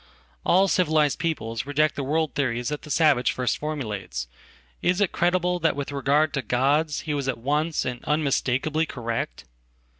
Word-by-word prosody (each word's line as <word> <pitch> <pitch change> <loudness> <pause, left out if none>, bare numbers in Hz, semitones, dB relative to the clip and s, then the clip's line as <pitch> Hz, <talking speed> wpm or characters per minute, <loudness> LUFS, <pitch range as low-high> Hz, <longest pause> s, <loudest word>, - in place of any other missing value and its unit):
All 190 +2 +4
civilized 155 -5 +2
peoples 130 -8 -2
reject 150 +1 +2
theworld 150 +1 -1
theories 120 -3 -1
that 150 0 -4
the - - -12
savage 145 -5 +3
first 125 -1 -1
formulates. 105 - -4 0.5
Is 180 +2 +2
it 205 -3 +2
crediblethat 175 -1 +1
with 140 0 -4
regard 145 +2 +2
to 140 - 0
gods 140 +6 +1
he 155 - -3
was 140 -2 -2
at 135 - -1
once 150 +6 0
and 125 -1 -4
unmistakably 150 +1 +1
correct? 115 -4 -4
145 Hz, 150 wpm, -25 LUFS, 130-155 Hz, 0.5 s, All